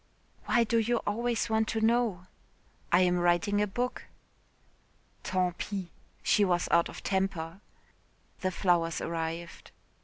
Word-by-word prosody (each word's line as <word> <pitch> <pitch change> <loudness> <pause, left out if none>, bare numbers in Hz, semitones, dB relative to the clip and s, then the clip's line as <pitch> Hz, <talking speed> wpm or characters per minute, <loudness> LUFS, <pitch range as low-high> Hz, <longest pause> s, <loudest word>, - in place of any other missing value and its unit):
"Why 240 - +3
do 230 +1 +1
you 235 +2 +1
always 235 +2 0
want 220 -1 +1
to 225 - -1
know?" 220 -5 +1 0.7
"I 175 - +5
am 180 -1 +3
writing 175 +4 +2
a 210 - +2
book." 245 +5 -3 1.2
"Tant 180 -2 -1
pis." 195 -4 -4 0.3
She 210 - +4
was 175 -2 +1
out 170 0 +4
of - - -10
temper. 190 -2 -2 0.8
The 185 - 0
flowers 170 -3 +1
arrived. 165 +1 -4
190 Hz, 130 wpm, -29 LUFS, 175-220 Hz, 1.2 s, I